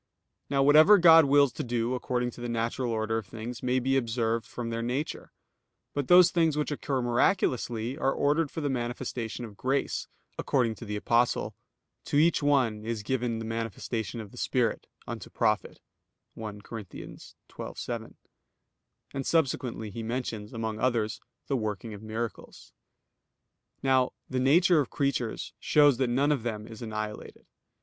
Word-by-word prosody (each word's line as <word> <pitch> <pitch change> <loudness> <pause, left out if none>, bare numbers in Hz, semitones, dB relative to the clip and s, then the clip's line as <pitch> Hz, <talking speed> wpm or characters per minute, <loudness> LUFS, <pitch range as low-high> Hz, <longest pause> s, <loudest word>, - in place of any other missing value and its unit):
Now 135 -1 +2
whatever 155 +8 +8
God 165 -3 +8
wills 140 -2 +4
to - - -4
do 120 0 -1
according 125 -1 -1
to 120 - -12
the 120 - -4
natural 115 +1 -1
order 110 0 0
of 105 - -10
things 115 +1 -7
may 125 0 +1
be 130 +1 +1
observed 115 -3 0
from 120 -1 -5
their 115 0 -2
nature; 130 +6 -3 0.6
but 145 -3 -2
those 180 -1 +7
things 165 -3 +2
which 150 0 -1
occur 135 -3 -2
miraculously, 120 - +1
are 135 - +2
ordered 145 +3 +1
for 160 - -5
the 145 - -1
manifestation 120 -1 -3
of 105 -3 -11
grace, 135 +5 -1 0.3
according 125 -5 +1
to 115 - -10
the 105 -1 -4
Apostle, 115 +3 +1 0.5
"To - - 0
each 165 +2 +4
one 130 -7 +2
is 110 -2 -3
given 120 0 -1
the 115 - -5
manifestation 115 0 -4
of 105 -3 -8
the 125 - -10
Spirit, 120 -4 0 0.2
unto - - -7
profit" - - 0 0.5
(1 105 -2 -7
Cor. 115 - -6
12:7); 115 +3 -8 1.0
and 135 - -3
subsequently 125 -8 0
he 115 - -6
mentions, 115 -2 -4
among 110 -1 -4
others, 115 -4 0 0.2
the 140 - -1
working 110 -2 -3
of 105 - -9
miracles. 110 +1 -6 1.1
Now 130 -1 +3
the 130 - -2
nature 165 +6 +5
of 140 - 0
creatures 140 -5 -2
shows 145 -4 +4
that 130 -1 +1
none 140 +5 +2
of 145 -5 +1
them 110 -2 -4
is 110 0 -11
annihilated. 110 -2 -6
120 Hz, 155 wpm, -28 LUFS, 115-135 Hz, 1.1 s, whatever